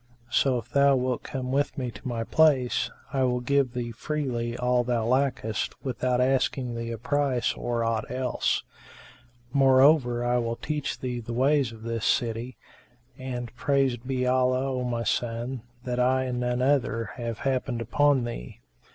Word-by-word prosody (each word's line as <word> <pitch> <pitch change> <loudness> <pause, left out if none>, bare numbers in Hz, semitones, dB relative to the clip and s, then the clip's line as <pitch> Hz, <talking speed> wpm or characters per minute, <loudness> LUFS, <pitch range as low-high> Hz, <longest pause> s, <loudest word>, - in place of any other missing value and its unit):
So 130 +1 +3
if 120 0 -7
thou 140 0 +5
wilt 125 -1 -1
come 130 -2 -4
with 140 +2 0
me 125 -3 -2
to 130 - -9
my 115 -2 -2
place, 130 -4 +3 0.2
I 135 - +1
will 125 -1 +2
give 135 0 +1
thee 120 -2 -3
freely 120 -2 -3
all 125 0 +2
thou 120 -2 0
lackest 125 -4 0
without 125 -1 0
asking 130 -1 +1
thee 115 0 -4
a 115 - -4
price 140 0 0
or 120 -1 -2
aught 115 -1 -1
else. 125 0 0 0.9
Moreover 135 -2 +5
I 120 0 +2
will 115 -1 -2
teach 150 +3 -3
thee 125 -1 -3
the 115 0 -6
ways 135 0 +2
of 110 -1 -12
this 115 -1 -3
city; 120 +2 -1 0.6
and, 125 -2 -5
praised 130 -1 0
be 130 -1 0
Allah, 130 +1 +2
O 125 -1 -2
my 120 -1 -2
son, 120 +2 -2 0.2
that 125 -1 -2
I, 130 +1 +3
and 125 -1 -2
none 125 0 0
other 130 -4 +1
have 115 -2 -4
happened 130 -2 0
upon 140 +3 +2
thee." - - -6
125 Hz, 165 wpm, -27 LUFS, 120-130 Hz, 0.9 s, thou